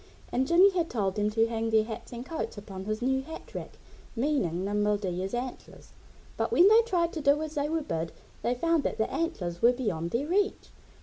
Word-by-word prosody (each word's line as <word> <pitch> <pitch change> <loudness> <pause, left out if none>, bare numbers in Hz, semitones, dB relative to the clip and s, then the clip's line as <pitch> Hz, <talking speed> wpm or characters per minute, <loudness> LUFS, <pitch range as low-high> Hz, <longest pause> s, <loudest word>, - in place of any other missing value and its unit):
And 260 +2 +1
Jimmy 365 +4 +6
had 345 -3 0
told 200 -5 0
them 210 0 0
to 225 +1 +2
hang 225 0 -2
their 220 -1 +4
hats 225 +1 -7
and 240 +1 -6
coats 315 -5 -4
upon 195 -2 -8
his 215 +2 -2
new 265 +1 +2
hat 320 +4 -10
rack - - -7 0.4
meaning 225 - 0
Nimble 210 +1 +1
Deer's 190 +1 -3
antlers. 245 +1 -7 0.5
But - - -1
when 355 - +6
they 445 +2 +7
tried 355 -7 0
to 315 - -3
do 285 +1 +4
as 310 -1 -5
they 290 0 -1
were 320 -1 -1
bid 165 - -3 0.3
they 245 - 0
found 330 +4 +2
that - - -2
the 220 - 0
antlers 180 - -2
were 240 +2 +6
beyond 195 -10 -2
their 240 +9 -1
reach. 395 +6 0
240 Hz, 210 wpm, -28 LUFS, 205-315 Hz, 0.5 s, they